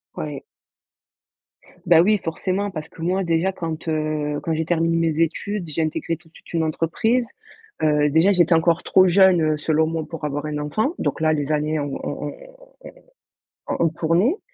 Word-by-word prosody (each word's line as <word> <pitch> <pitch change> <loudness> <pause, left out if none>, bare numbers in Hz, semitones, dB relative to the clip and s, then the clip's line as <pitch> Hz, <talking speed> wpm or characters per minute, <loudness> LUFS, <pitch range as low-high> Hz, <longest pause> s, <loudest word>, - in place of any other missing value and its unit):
Ouais. 75 -1 -5 1.4
Bah 165 -2 +6
oui, 210 +4 +3
forcément, 190 +4 -2
parce 155 -2 -6
que - - -14
moi 185 +3 0
déjà 170 +3 +1
quand, 165 -3 -5
heu, 155 -1 -1
quand 165 - -2
j'ai 160 +1 0
terminé 165 0 +1
mes 165 -1 +1
études, 180 +3 -2
j'ai 155 +2 -1
intégré 160 +1 -2
tout 165 -1 -21
de - - -37
suite - - -16
une 165 -1 +1
entreprise. 195 +10 0 0.5
Heu, 150 -1 +3
déjà 165 +7 +4
j'étais 175 -2 +4
encore 165 0 +2
trop 190 0 +5
jeune, 185 -1 +5
heu, 155 -1 +1
selon 160 +1 +1
moi 160 -1 -3
pour 165 -2 -8
avoir 145 0 -3
un 150 -1 -3
enfant. 215 - -1
Donc - - -2
là, 155 0 +2
les 145 0 -2
années 150 0 0
ont 145 -1 -3
ont - - -4
ont - - -8 1.3
ont - - -1
ont 170 - +3
ont - - +3
tourné. 170 - +1
165 Hz, 190 wpm, -22 LUFS, 155-175 Hz, 1.4 s, Bah